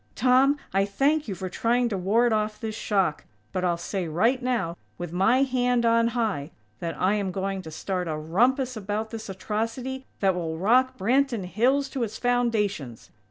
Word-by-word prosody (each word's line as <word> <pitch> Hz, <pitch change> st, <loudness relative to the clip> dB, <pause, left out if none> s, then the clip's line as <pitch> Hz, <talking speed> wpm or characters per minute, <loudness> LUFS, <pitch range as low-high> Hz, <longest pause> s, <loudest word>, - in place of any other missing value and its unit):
Tom, 260 Hz, +5 st, +4 dB, 0.2 s
I 195 Hz, 0 st, +3 dB
thank 275 Hz, +10 st, +1 dB
you 195 Hz, -, -3 dB
for 185 Hz, +1 st, -5 dB
trying 240 Hz, +6 st, +1 dB
to 210 Hz, -, -2 dB
ward 220 Hz, +6 st, +2 dB
off 215 Hz, 0 st, -1 dB
this 220 Hz, -1 st, -4 dB
shock; 195 Hz, -7 st, 0 dB, 0.3 s
but 185 Hz, -, -2 dB
I'll 175 Hz, -2 st, +1 dB
say 180 Hz, +1 st, -3 dB
right 225 Hz, -, +2 dB
now, 235 Hz, -10 st, -1 dB, 0.2 s
with 175 Hz, -1 st, -6 dB
my 225 Hz, +9 st, +4 dB
hand 250 Hz, -2 st, +1 dB
on 230 Hz, 0 st, +4 dB
high, 200 Hz, -11 st, -1 dB, 0.3 s
that 165 Hz, -1 st, -4 dB
I 190 Hz, +2 st, +3 dB
am 205 Hz, -2 st, -1 dB
going 195 Hz, +1 st, -2 dB
to 160 Hz, -, -9 dB
start 180 Hz, +3 st, -3 dB
a 155 Hz, -1 st, -2 dB
rumpus 245 Hz, -, +1 dB
about 215 Hz, +1 st, -3 dB
this 220 Hz, -2 st, -7 dB
atrocity 230 Hz, +7 st, -3 dB
that 195 Hz, -2 st, +3 dB
will 165 Hz, -3 st, -3 dB
rock 255 Hz, +8 st, +3 dB
Branton 240 Hz, 0 st, +1 dB
Hills 255 Hz, +9 st, +2 dB
to 270 Hz, -, -4 dB
its 220 Hz, -2 st, -2 dB
foundations! 210 Hz, -, -1 dB
215 Hz, 180 wpm, -26 LUFS, 185-245 Hz, 0.3 s, Tom